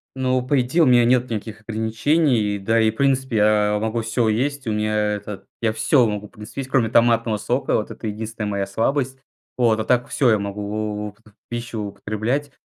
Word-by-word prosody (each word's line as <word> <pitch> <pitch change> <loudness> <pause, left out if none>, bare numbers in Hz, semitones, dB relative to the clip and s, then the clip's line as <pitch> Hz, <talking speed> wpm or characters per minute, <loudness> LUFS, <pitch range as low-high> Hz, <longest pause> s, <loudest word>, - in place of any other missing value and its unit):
Ну, 130 -1 0
по 140 +1 +2
идее, 130 +8 +2
у - - +5
меня 120 -2 +5
нет 125 0 +2
никаких 110 0 -5
ограничений, 110 +1 +1
да 115 +3 +2
и 110 0 +3
в - - -17
принципе 130 -3 +1
я 105 0 +3
могу 110 +1 -1
всё 115 +1 0
есть. 130 +4 -1
У - - 0
меня 105 0 -1 0.2
это 100 -1 -8 0.2
я 115 - +2
всё 110 +4 +3
могу 105 -1 -3
в - - -28
принципе 110 +4 -7
есть, 130 - -8
кроме 120 -4 +2
томатного 115 -1 +3
сока. 125 +5 -1
Вот 105 - -2
это 110 - -6
единственная 110 0 -4
моя 100 -1 -1
слабость. 130 +6 -1 0.4
Вот. 115 -3 +3
А 110 - -2
так 125 -1 +2
всё 130 -4 +2
я 110 - +4
могу 105 +1 -4
в - - -29
в - - -27 0.2
пищу 120 -1 -5
употреблять. 110 +8 -3
115 Hz, 205 wpm, -22 LUFS, 105-125 Hz, 0.4 s, у